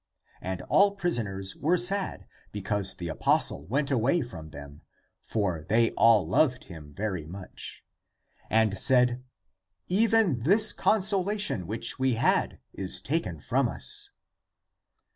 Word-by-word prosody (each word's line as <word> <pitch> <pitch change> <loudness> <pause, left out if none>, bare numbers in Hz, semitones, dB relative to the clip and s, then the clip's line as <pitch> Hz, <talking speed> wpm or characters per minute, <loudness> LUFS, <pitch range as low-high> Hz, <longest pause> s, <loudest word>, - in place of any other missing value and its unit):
And 95 0 -5
all 200 0 +3
prisoners 105 - -2
were 170 +5 +1
sad 190 +3 0 0.3
because 100 -1 -1
the 85 - -6
apostle 80 -2 0
went 140 +5 -1
away 135 +7 +1
from 80 -10 -10
them 70 0 -11 0.2
— - - -47
for 95 -7 -1
they 115 +8 +1
all 110 -7 +4
loved 125 - +1
him 80 -5 -12
very 95 -1 -4
much 90 +3 -9 0.3
— - - -45
and 110 -3 +2
said, 125 -1 +4 0.3
" 95 - -60 0.2
Even 210 - +2
this 205 - +4
consolation 200 - 0
which 110 +5 -2
we 130 -2 +1
had 115 - +1 0.2
is 95 -1 -1
taken 95 - -3
from - - 0
us!" - - -2
115 Hz, 135 wpm, -27 LUFS, -, 0.3 s, all